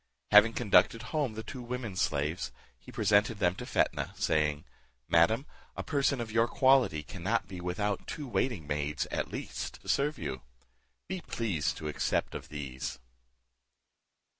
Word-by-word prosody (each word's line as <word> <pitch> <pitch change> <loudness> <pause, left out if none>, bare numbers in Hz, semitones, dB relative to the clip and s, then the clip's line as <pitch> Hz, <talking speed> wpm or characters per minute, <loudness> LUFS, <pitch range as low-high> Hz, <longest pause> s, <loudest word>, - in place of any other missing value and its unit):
Having 105 +2 +8
conducted 115 0 +4
home 145 -8 0
the 110 - -5
two 125 +4 -7
women 120 -4 -4
slaves, 75 0 -1 0.3
he - - -13
presented 105 +2 +3
them 90 -4 +2
to - - -8
Fetnah, - - 0
saying, 75 -2 +1 0.4
"Madam, 110 - +4 0.3
a - - -3
person 140 -2 +1
of 115 -2 -4
your 115 +1 +3
quality 130 - +4
cannot 100 +5 -2
be 90 -2 -7
without 100 +3 -2
two 145 - -5
waiting 120 - -1
maids, 75 -1 -1
at - - -2
least, - - -5
to - - -16
serve 145 +2 +1
you; 65 -5 -4 0.7
be 185 -2 -4
pleased 100 - -1
to 75 - -5
accept 75 - -1
of - - -7
these." 70 -3 -5
105 Hz, 150 wpm, -31 LUFS, 75-120 Hz, 0.7 s, Having